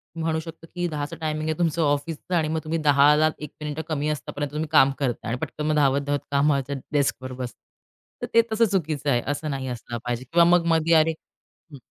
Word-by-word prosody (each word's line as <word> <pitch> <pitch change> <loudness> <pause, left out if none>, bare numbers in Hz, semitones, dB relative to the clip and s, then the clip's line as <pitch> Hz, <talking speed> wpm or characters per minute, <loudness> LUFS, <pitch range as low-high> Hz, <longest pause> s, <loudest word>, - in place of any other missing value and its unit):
म्हणू 160 -1 -1
शकतो, 165 0 -10
की 175 0 -1
10:00 145 -2 -4
टायमिंग 155 0 -2
आहे 155 - -1
तुमचं 165 -1 +1
ऑफिसचा 155 +4 -1
आणि 155 - +1
मग 160 +1 -1
तुम्ही 165 +1 -2
दहाला 150 +1 +5
एक 150 -2 -8
मिनिटं 150 +1 -3
कमी 150 -1 -1
असतापर्यंत 145 -1 -4
तुम्ही 155 +1 -2
काम 135 -3 +6
करताय 125 -5 -2
आणि 125 - -1
पटकन 155 0 -2
धावत-धावत 140 0 +2
कामाच्या, 140 -1 +1 0.2
डेस्कवर 130 -2 0
बसता. 125 -3 -7 0.6
तर - - -3
ते 230 - +7
तसं 225 +1 +4
चुकीचं 155 -6 -1
आहे 120 -3 +2
असं 145 +2 -2
नाही 135 -1 -4
असला 120 -1 -5
पाहिजे. 120 0 -2
किंवा 170 0 +6
मग 175 -1 +4
मधी 165 0 +3
अरे! 160 0 +5 0.6
हं. 140 - -10
150 Hz, 195 wpm, -24 LUFS, 140-160 Hz, 0.6 s, ते